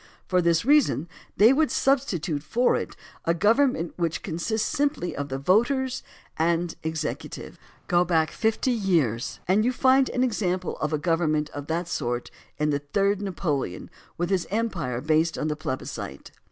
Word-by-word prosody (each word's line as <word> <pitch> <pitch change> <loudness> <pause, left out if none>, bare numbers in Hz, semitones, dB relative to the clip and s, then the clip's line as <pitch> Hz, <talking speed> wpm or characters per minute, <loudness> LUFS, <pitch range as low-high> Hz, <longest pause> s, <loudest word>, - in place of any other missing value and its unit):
For 180 -1 +2
this 170 +1 +2
reason 280 - +3 0.3
they 220 +5 +7
would 305 +2 +2
substitute 195 - 0
for 240 - +2
it - - -4 0.3
a 170 - +2
government 215 - +2
which 170 -2 -1
consists 215 +7 -1
simply 285 - -1
of 145 0 -4
the 135 - -2
voters 240 - +1 0.4
and 170 +1 +1
executive. 160 -1 -5 0.3
Go 175 0 +3
back 165 -3 +1
fifty 225 +3 0
years 165 - 0
and 195 +4 +3
you 245 - +2
find 260 +1 +4
an 250 - 0
example 185 -7 -1
of 155 - -1
a 155 - +1
government 155 -2 0
of 145 0 -7
that 165 +2 -2
sort 120 -7 -3 0.3
in 150 0 +1
the 145 - 0
Third 200 +7 0
Napoleon 160 - -3 0.3
with 175 +2 -1
his 185 -3 +1
empire 175 - -2
based 155 +2 +1
on 155 - -1
the 150 - -1
plebiscite. 130 -3 -6
175 Hz, 160 wpm, -25 LUFS, 155-220 Hz, 0.4 s, they